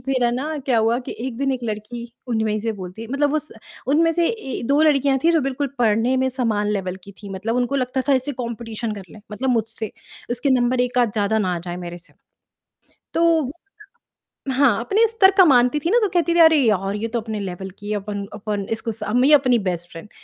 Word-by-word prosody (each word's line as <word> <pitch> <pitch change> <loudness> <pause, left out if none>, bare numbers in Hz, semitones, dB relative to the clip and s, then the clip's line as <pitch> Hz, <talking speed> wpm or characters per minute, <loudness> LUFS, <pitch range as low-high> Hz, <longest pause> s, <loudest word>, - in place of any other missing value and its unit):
फिर 260 -1 0
है 240 - +3
ना, 300 +5 -3
क्या 255 -4 +1
हुआ 225 +2 +2
कि - - -4
एक 245 -2 -4
दिन, 275 -1 +1
एक 255 - -3
लड़की 230 +2 -6 0.2
उनमें 220 -2 0
से 225 - -3
ही - - +1
बोलती 185 +3 -8
है 230 - -9
मतलब 280 +2 +1
उस 305 0 -2 0.4
उनमें 330 +3 +4
से 340 0 +1
ए 435 - -4
2 285 +4 +3
लड़कियाँ 280 -3 +3
थी 335 - +6
जो 325 -2 +3
बिल्कुल 275 +1 -2
पढ़ने 230 +2 +2
में 260 0 +1
समान 225 -5 0
लेवल 190 -2 -3
की 200 - -12
थी, 200 +1 -12
मतलब 210 +5 -3
उनको 250 +3 0
लगता 255 0 -1
था - - +5
इससे 260 +3 -1
कॉम्पिटिशन 235 -2 -5
कर 200 - -8
ले, 215 - -12
मतलब 260 +4 -1
मुझसे, 225 -2 -2 0.4
उसके 250 +3 0
नंबर 250 0 +2
एक 250 0 0
आध 240 -4 +2
ज़्यादा 215 +1 +1
ना 185 -4 0
आ - - -3
जाए 175 +1 -6
मेरे 175 -1 -7
से। 175 - -18 1.0
तो 330 -5 +3 1.0
हाँ, 255 -5 +3
अपने 410 - +3
स्तर 420 -4 +5
का 375 - +9
मानती 250 +1 +4
थी 335 +5 -1
ना 475 - +5
तो 420 - +3
कहती 345 -2 +1
थी - - +2
"अरे 320 -1 +7
यार! 195 -2 +1
ये 225 +2 -3
तो 235 +1 -2
अपने 220 -1 -5
लेवल 190 0 -5
की 205 0 -7
है 210 - 0
अपन 205 0 -4
अपन 205 -1 -3
इसको 225 +1 -2
स 215 0 -8 0.2
ये 295 +2 +6
अपनी 255 -4 +4
बेस्ट 175 0 -6
फ्रेंड" 165 +5 -10
240 Hz, 230 wpm, -21 LUFS, 210-275 Hz, 1.0 s, का